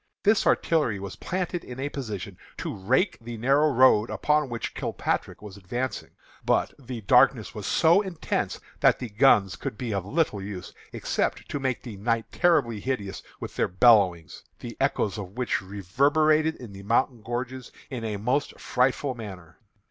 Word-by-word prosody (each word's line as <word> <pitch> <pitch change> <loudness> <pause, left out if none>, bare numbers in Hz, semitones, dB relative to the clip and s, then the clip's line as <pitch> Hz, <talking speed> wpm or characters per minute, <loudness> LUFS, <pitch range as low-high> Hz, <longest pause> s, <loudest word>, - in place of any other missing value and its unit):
This 215 +1 +3
artillery 150 -11 +2
was 100 -1 -7
planted 180 -1 -3
in 125 +1 -9
a 135 - -1
position 105 -9 -6 0.2
to - - -4
rake 125 - +1
the 115 0 -7
narrow 140 +6 +3
road 130 -5 +5
upon 150 -2 +1
which 115 -1 -4
Kilpatrick - - -3
was 105 -2 -9
advancing. 120 +7 -4 0.3
But - - +1
the 125 -3 -7
darkness 125 0 +4
was 105 -4 -6
so 170 +4 +4
intense 185 -5 -3 0.2
that - - +4
the 125 - -6
guns 105 -4 +4
could 105 - -6
be 120 -3 -3
of 100 -2 -1
little 125 - 0
use, 95 -2 -7 0.2
except - - -2
to 145 - -3
make 130 -2 -2
the 115 -5 -8
night 115 +2 -1
terribly 145 - +2
hideous 100 -5 -3 0.2
with - - -7
their - - +2
bellowings, 95 -5 +3 0.2
the - - -8
echoes 105 +1 0
of 100 +2 -8
which 125 -5 0
reverberated 145 - +2
in 115 -5 -11
the 95 - -9
mountain 120 +3 +1
gorges 125 +2 -5 0.2
in 125 -3 -4
a 110 -2 -2
most 125 +8 -1
frightful 130 +2 0
manner. 90 - -10
120 Hz, 165 wpm, -26 LUFS, 100-135 Hz, 0.3 s, road